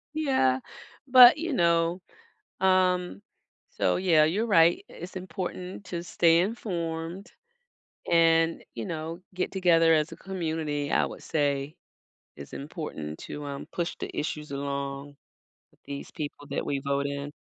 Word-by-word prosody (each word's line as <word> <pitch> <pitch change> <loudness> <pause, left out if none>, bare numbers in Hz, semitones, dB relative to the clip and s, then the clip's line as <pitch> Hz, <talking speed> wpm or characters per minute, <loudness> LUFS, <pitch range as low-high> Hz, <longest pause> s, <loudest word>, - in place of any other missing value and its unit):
Yeah, 260 - +2 0.5
but 255 +1 +9
you 330 -1 -2
know, 170 -3 +2 0.6
um, 185 -1 +2 0.5
so - - +1
yeah, 170 -5 +4
you're 195 +9 0
right, 170 -5 +4
it's 175 +2 -10
important 185 +1 -6
to 170 -1 -4
stay 170 -1 +3
informed 175 -3 -3 0.8
and, 165 0 +3
you 115 -2 -5
know, 165 +1 -5
get 180 - -2
together 170 -3 +4
as 155 0 +1
a - - -8
community, 160 -6 -3
I - - +3
would - - -9
say 145 -1 -1 0.6
is 70 - -10
important 140 - -6
to, 145 0 -7
um, 140 -1 -6
push 175 -1 -2
the - - -5
issues 150 -1 -4
along 140 0 -4 0.6
with - - -30
these 140 0 -7
people 145 -1 -6
that - - -2
we 140 - -1
vote 140 0 -1
in. 140 +1 -5
165 Hz, 135 wpm, -27 LUFS, 145-180 Hz, 0.8 s, but